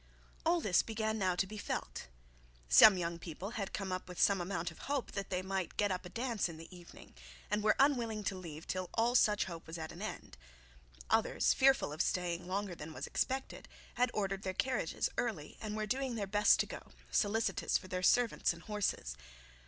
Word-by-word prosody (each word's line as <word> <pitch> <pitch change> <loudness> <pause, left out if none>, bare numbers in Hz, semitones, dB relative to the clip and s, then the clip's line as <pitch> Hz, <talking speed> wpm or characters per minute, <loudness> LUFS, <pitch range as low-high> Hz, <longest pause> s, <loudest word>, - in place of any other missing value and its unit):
All 345 +1 +4
this 185 - +4
began 220 -1 -2
now 185 -2 +1
to 180 - +1
be 210 +2 -8
felt. - - -4 0.6
Some 65 - +9
young 170 -1 -2
people 180 +5 -6
had 200 -4 -4
come 195 -2 -3 0.2
with 180 -1 -8
some 195 -2 +4
amount 175 -1 -2
of 160 - -15
hope 285 -3 -1
that 195 -1 -4
they 185 0 -1
might 190 -2 -3
get 205 -1 +2
up 180 -1 -3
a - - -11
dance 230 -2 -1
in 165 - -8
the 165 +3 -11
evening, 175 -1 -14 0.4
and 210 0 +1
were 215 - +4
unwilling 235 -6 +2
to 195 - -1
leave 165 -3 -8
till 185 -1 -3
all 235 +1 +2
such 210 -4 +4
hope 170 -3 -8
was 160 +1 -6
at 160 -1 -5
an - - -10
end. - - -6 0.7
Others, - - +3
fearful 265 - +3
of 155 - -1
staying 175 -1 -1
longer 195 0 -2
than 160 -1 -8
was - - -5
expected, 265 +1 -2 0.3
had 250 +1 +2
ordered 195 -3 -2
their 190 -1 -3
carriages 260 +5 0
early, 210 -12 -3
and 215 -1 -4
were 215 - -1
doing 260 +3 -1
their 210 -3 -2
best 205 +2 +4
to - - -1
go, - - -10 0.2
solicitous 220 +2 +1
for 185 - -11
their 185 0 -3
servants 235 0 +3
and 170 0 -13
horses. 205 - -2
195 Hz, 200 wpm, -34 LUFS, 175-220 Hz, 0.7 s, Some